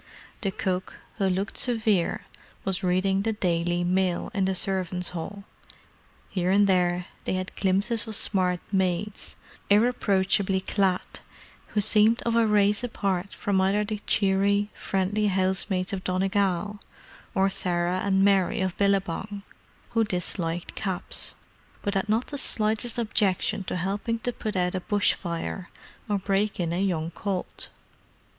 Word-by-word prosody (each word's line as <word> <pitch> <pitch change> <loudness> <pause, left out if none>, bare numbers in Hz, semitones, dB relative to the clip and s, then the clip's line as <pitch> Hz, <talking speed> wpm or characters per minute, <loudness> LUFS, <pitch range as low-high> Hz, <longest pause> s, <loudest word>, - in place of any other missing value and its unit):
The 200 - 0
cook, 185 -1 -2 0.2
who 195 -3 +1
looked 190 +2 -2
severe, 220 -7 +1 0.4
was 190 -1 0
reading 190 +1 +1
the 220 +2 0
Daily 175 -3 0
Mail 180 0 0
in 195 -1 +1
the 190 0 0
servants' 185 -1 -1
hall; 195 +4 -6 0.8
here 180 -2 -1
and 200 +2 +5
there 180 -2 +2 0.2
they - - 0
had 185 0 -3
glimpses 205 +5 +1
of 220 - 0
smart 180 -3 +1
maids, 190 +1 -1 0.3
irreproachably 200 -3 +2
clad, 190 -1 0 0.5
who 210 - 0
seemed 215 +3 +5
of 235 -1 0
a 230 -1 +4
race 210 +1 +3
apart 195 -5 -2
from 195 -2 +1
either 195 +2 +2
the 210 0 -3
cheery, 200 +1 +2
friendly 200 +2 0
housemaids 190 0 0
of 185 -1 -3
Donegal, 195 +1 0 0.6
or 190 0 +4
Sarah 180 -1 -1
and 195 -1 +3
Mary 195 -2 +3
of 190 -1 -1
Billabong, 200 0 0 0.5
who 230 -1 +3
disliked 175 -4 -2
caps, 190 -3 -2 0.5
but 200 - -1
had 195 +1 -1
not 225 +3 +2
the 285 - -5
slightest 220 +1 +1
objection 210 -2 +2
to - - -3
helping 200 +6 -1
to 245 +2 -2
put 215 -3 -4
out 180 -1 +1
a 185 - -2
bush 205 +1 +2
fire 175 +1 -5 0.4
or 205 - +2
break 195 +1 0
in 170 -1 -1
a 180 - 0
young 170 -4 -1
colt. 190 +1 -4
195 Hz, 145 wpm, -26 LUFS, 185-205 Hz, 0.8 s, and